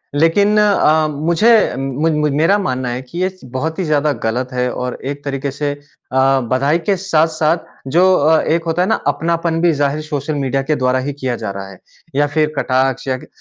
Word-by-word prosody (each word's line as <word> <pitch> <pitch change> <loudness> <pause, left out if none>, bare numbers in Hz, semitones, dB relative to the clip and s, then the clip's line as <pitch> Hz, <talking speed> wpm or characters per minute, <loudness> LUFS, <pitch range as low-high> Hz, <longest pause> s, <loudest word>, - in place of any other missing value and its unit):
लेकिन 200 +8 +3
अ, 160 -7 +3
मुझे 165 +9 +2 0.3
म 135 +3 -1 0.2
म 150 - +1
मेरा 165 +7 +3
मानना 130 -9 -2
है 120 +1 -3
कि 130 +6 -11
ये 185 - +1
स 185 0 -19
बहुत 160 +5 -3
ही - - 0
ज़्यादा 150 -1 +1
ग़लत 120 +3 -1
है। 125 0 0
और 125 0 -4
एक 145 +1 -5
तरीके 140 0 -3
से 145 +1 -2
अ, 135 -2 -1
बधाई 140 +5 +2
के 195 +4 0
साथ-साथ 160 -3 +1 0.3
जो 170 +5 +4
अ, 160 0 +3
एक 165 +1 0
होता 165 +1 0
है 180 - +1
ना 220 - +3
अपनापन 165 0 0
भी 175 0 +4
ज़ाहिर 145 +1 0
सोशल 150 0 -3
मीडिया 135 -1 -1
के 155 +2 0
द्वारा 130 -1 +1
ही 140 +2 -3
किया 130 -3 -3
जा 105 -3 -4
रहा 100 0 -7
है। 95 - -14 0.4
या 145 +1 +3
फिर 155 +1 0
कटाक्ष 130 0 0
या 130 -1 0
ग - - -14
145 Hz, 210 wpm, -17 LUFS, 130-165 Hz, 0.4 s, जो